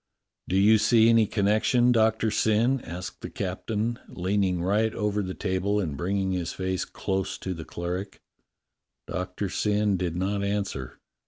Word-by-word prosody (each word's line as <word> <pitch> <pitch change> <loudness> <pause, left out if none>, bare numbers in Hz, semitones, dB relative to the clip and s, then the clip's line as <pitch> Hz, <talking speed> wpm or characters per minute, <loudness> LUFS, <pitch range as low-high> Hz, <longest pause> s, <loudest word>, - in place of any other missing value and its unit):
"Do 95 - -1
you 105 +3 +6
see 110 +1 +5
any 115 -2 +5
connection, 110 +5 +3
Doctor 110 -1 +2
Syn?" 115 +5 +2
asked 90 +3 -7
the - - -6
captain, 110 +5 -3
leaning 95 -1 0
right 105 +4 +2
over 105 -1 0
the 95 -1 -4
table 100 +1 0
and 80 -8 -2
bringing 95 +5 -1
his 90 -2 -2
face 95 0 -2
close 95 0 -3
to 95 - -4
the 80 -2 -8
cleric. 90 +3 -5 0.9
Doctor 90 +2 -3
Syn 105 +1 +1
did 85 -2 -2
not 100 +3 -1
answer. 100 -11 -3
100 Hz, 150 wpm, -26 LUFS, 90-110 Hz, 0.9 s, you